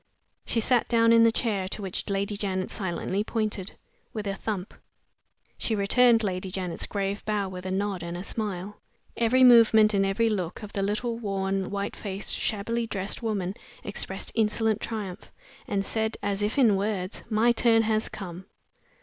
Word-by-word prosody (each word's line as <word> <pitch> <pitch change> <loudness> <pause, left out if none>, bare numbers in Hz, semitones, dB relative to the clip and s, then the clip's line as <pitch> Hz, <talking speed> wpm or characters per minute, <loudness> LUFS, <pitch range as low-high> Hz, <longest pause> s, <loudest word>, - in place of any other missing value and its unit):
She 230 - +1
sat 240 +1 +3
down 230 -1 +4
in 230 - +7
the 230 0 +6
chair, 210 -5 -1
to 210 - -3
which 190 +2 -4
Lady 200 +1 -1
Janet 190 -2 -2
silently 190 0 -2
pointed, 215 -3 -3 0.4
with 215 -2 -4
a 200 - -1
thump; 200 -1 -4 0.9
she 225 - 0
returned 230 +3 +4
Lady 185 -1 -2
Janet's 185 -2 -3
grave 200 0 -2
bow 210 -2 -1
with 185 0 -7
a - - -2
nod 195 -1 -1
and 170 0 -5
a 180 - -5
smile. 205 -2 -4 0.3
Every 240 +3 +3
movement 225 -3 +7
and 195 -1 +3
every 195 +4 +1
look 190 -2 -2
of 210 - -8
the 200 - -1
little, 220 +4 -1
worn, 195 -3 -1
white 200 0 -3
faced, 200 -1 -3
shabbily 230 +3 -1
dressed 195 +1 -2
woman 200 -5 -2 0.3
expressed - - -3
insolent 220 0 +1
triumph, 210 -3 -5 0.4
and 195 -1 -1
said, 220 +1 -1
as 200 0 -1
if 210 +6 -1
in 230 -7 +5
words, 195 -1 -2
"My 225 +2 +4
turn 230 -1 +4
has 215 0 0
come!" 185 -2 -8
205 Hz, 170 wpm, -27 LUFS, 195-225 Hz, 0.9 s, in